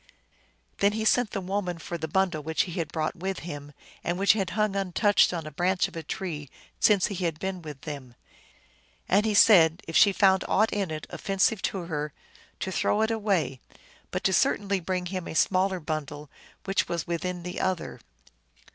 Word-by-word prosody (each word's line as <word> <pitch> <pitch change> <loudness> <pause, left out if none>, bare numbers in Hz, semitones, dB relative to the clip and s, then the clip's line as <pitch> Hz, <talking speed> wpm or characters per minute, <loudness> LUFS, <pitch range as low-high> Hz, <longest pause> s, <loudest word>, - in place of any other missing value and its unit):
Then 200 +1 +3
he 220 0 -2
sent 245 0 +3
the 200 - -3
woman 185 -1 -2
for 165 +2 -6
the 160 -1 -3
bundle 180 -1 0
which 160 +2 0
he 180 - -7
had 165 -3 -3
brought 155 -1 -2
with 190 +2 -4
him, 145 -3 -7 0.3
and 175 +1 -1
which 195 +1 +5
had 195 -4 -1
hung 210 -2 +1
untouched 195 +2 +3
on 170 -3 -4
a 155 - -7
branch 180 +5 +1
of - - -14
a 165 - -4
tree 160 -4 -5 0.3
since 200 -3 +4
he 190 -3 -3
had 165 -3 -1
been 190 +1 -4
with 150 -4 -9
them. 135 -5 -8 0.9
And 205 +4 +3
he 215 - +1
said 170 -6 +6
if 165 - -6
she 205 - +7
found 190 -1 +4
aught 215 +2 +2
in 200 -4 -1
it 155 -1 -5
offensive 195 +2 +1
to 190 - -5
her 150 -3 -4 0.5
to 190 - -2
throw 210 +3 +1
it 220 - +1
away, 200 - 0 0.5
but - - -3
to 190 - +2
certainly 200 +2 +2
bring 180 +1 -2
him 185 -1 -4
a - - -6
smaller 185 +2 +2
bundle 150 -2 -5 0.3
which 195 0 0
was 170 -3 -2
within 175 +1 -3
the 180 +1 -5
other. 185 -2 -2
180 Hz, 190 wpm, -27 LUFS, 160-195 Hz, 0.9 s, she